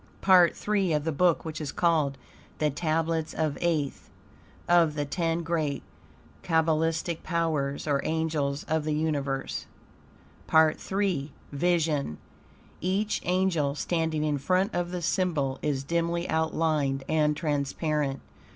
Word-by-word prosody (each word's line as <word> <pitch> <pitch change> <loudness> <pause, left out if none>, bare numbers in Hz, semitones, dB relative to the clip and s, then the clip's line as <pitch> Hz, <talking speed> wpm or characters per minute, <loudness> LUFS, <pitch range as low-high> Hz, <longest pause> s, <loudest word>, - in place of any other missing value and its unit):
PART 180 -3 +6
III 195 -5 +2
of 150 -1 +1
The 160 - -1
Book 170 +2 +2
which 160 0 -5
is 145 -3 -3
called 155 -5 +1 0.4
THE 150 -1 +1
TABLETS 160 +1 -1
OF 155 -3 0
AETH 155 -5 -1 0.6
OF 170 -3 +4
THE 145 -1 -1
TEN 165 +2 -1
GREAT 160 -4 -1 0.6
KABBALISTICAL 160 0 +1
POWERS 155 -5 -1
or 140 -2 +1
ANGELS 155 -3 -1
OF 160 0 -1
THE 155 0 -1
UNIVERSE 145 -3 -2 0.8
PART 160 +2 +3
III 185 -8 0 0.2
VISION 150 - 0 0.6
Each 195 +4 0
angel 175 -6 +1
standing 160 -1 -1
in 150 -2 0
front 185 +8 +1
of 175 0 -1
the 180 -1 -4
symbol 160 -7 0
is 140 -3 -1
dimly 170 +3 -1
outlined 155 -4 0
and 150 -1 +2
transparent. 145 -2 -1
160 Hz, 125 wpm, -27 LUFS, 145-170 Hz, 0.8 s, PART